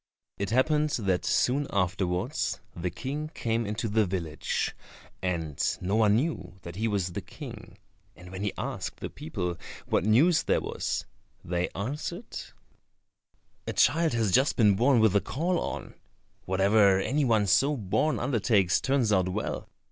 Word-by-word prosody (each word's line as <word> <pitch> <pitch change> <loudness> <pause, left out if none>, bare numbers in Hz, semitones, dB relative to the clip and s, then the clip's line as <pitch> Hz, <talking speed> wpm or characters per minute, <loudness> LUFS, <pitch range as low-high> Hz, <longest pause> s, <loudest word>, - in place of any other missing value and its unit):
It 100 - -1
happened 150 +6 +2
that 100 -8 0
soon 130 +6 +2
afterwards 90 -2 -1 0.2
the 90 +1 -2
King 145 - -4
came 115 -1 -1
into 105 +2 -2
the 110 +1 +2
village, 85 -5 -2 0.5
and 85 -6 -2 0.2
no 95 +3 -1
one 105 -2 +4
knew 140 - -2
that 85 0 -8
he 110 +4 0
was 100 -4 0
the - - -4
King, - - -10 0.4
and 90 0 -13
when 95 0 -6
he 105 -1 0
asked - - -4
the - - -5
people 95 - -4 0.3
what - - +1
news 135 - +4
there - - +1
was, - - -3 0.4
they 90 +1 -1
answered, 150 - -5 1.3
"A - - -2
child 165 -4 +3
has 115 -4 +1
just 135 +8 +3
been 105 -4 +5
born 120 +3 +4
with 110 -3 +4
a 100 - +4
caul 175 +6 -1
on; - - -5 0.5
whatever 95 +1 +4
any 140 +9 0
one 110 -5 +3
so 135 +10 +3
born 115 +9 0
undertakes 110 -7 +2
turns 130 -6 +2
out 95 -2 +2
well. 90 - -3
105 Hz, 155 wpm, -28 LUFS, 95-135 Hz, 1.3 s, been